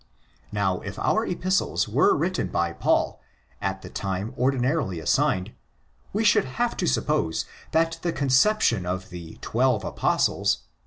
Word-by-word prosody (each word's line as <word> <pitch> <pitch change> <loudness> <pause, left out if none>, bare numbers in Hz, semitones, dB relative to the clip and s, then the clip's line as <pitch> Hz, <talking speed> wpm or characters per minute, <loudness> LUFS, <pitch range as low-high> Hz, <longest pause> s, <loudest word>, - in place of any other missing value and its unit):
Now, 95 -3 0
if 100 -1 -7
our 220 - +1
Epistles 185 +2 0
were 390 0 +3
written 185 - -1
by 85 0 0
Paul - - +1 0.4
at 95 0 -3
the - - -8
time 100 +4 -3
ordinarily 130 - 0
assigned, 90 +3 +1 0.6
we 215 +3 0
should 210 - +4
have 240 -1 +1
to - - 0
suppose 80 +5 0 0.2
that 165 0 +1
the 175 - 0
conception 135 - +2
of 90 +1 -3
the 85 -2 -9
'"'Twelve - - +1
Apostles'? - - +1
120 Hz, 140 wpm, -25 LUFS, -, 0.6 s, should